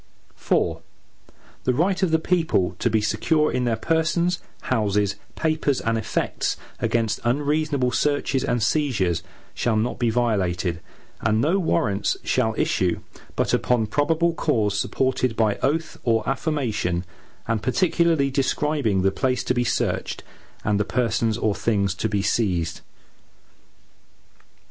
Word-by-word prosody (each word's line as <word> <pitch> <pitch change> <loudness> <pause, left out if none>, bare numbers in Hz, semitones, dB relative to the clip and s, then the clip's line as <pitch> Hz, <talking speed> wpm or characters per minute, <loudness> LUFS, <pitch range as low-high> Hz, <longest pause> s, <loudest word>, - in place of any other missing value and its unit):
IV - - +2 0.9
The 125 - +1
right 185 +6 +1
of 185 - +3
the 160 - +4
people 160 - +1
to 120 - +1
be 110 -1 +2
secure 150 +9 +1
in 125 0 0
their 115 -2 +1
persons, 170 +7 +1 0.2
houses, 105 -4 0 0.2
papers, 155 -4 0
and 115 0 0
effects, 110 -1 -1 0.2
against 115 -3 0
unreasonable 145 +1 +1
searches 145 0 0
and 120 -3 0
seizures, 115 - +1 0.3
shall 115 -2 0
not 110 +3 -1
be 120 -2 +2
violated, 95 -7 0 0.4
and 110 +1 +2
no 165 +11 +2
Warrants 100 - 0
shall 110 -4 +1
issue, 90 -2 +1 0.3
but - - 0
upon 120 -3 +2
probable 160 +8 +1
cause, 110 -11 0
supported 130 +1 0
by 110 -3 +2
oath 160 +5 -1
or 115 -2 +1
affirmation, 125 - -1 0.4
and 115 -2 0
particularly 160 - +2
describing 135 -7 +1
the 95 - +3
place 125 +5 0
to - - +1
be 120 -1 +1
searched, - - -1 0.4
and 105 -1 +1
the - - +3
persons 115 -1 0
or 110 -3 +1
things 100 -4 0
to 110 +4 -2
be 100 -1 0
seized. 90 -8 0
120 Hz, 135 wpm, -23 LUFS, 105-150 Hz, 0.9 s, the